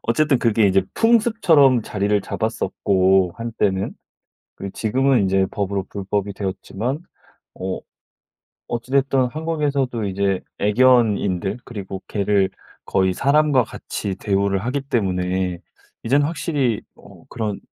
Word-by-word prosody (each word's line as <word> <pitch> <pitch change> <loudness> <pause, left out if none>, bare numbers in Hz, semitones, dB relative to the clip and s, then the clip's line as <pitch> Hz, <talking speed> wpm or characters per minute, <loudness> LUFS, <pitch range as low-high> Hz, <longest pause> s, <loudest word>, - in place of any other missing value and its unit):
어쨌든 140 +3 +2
그게 115 -3 +3
이제 95 0 +3
풍습처럼 215 - +4
자리를 105 0 0
잡았었고 95 -2 +1
한때는. 105 -4 -1 0.6
그리고 100 0 -6
지금은 130 +1 +2
이제 95 0 +2
법으로 100 -1 -2
불법이 100 0 -3
되었지만. 105 +7 -4 0.6
어. 95 0 -4 0.9
어찌 120 +2 -4
됐든 135 -1 +3
한국에서도 145 -7 -1
이제 100 -1 0 0.2
애견인들. 105 -4 +3
그리고 95 -4 -7
개를 100 -2 +1 0.4
거의 95 -1 +1
사람과 140 +3 +3
같이 100 -3 -5
대우를 100 0 0
하기 135 +3 -1
때문에 95 -7 -1 0.4
이제는 140 +5 +3
확실히 140 -7 -1
어 - - -16
그런 105 -3 -3
105 Hz, 285 characters per minute, -21 LUFS, 95-135 Hz, 0.9 s, 풍습처럼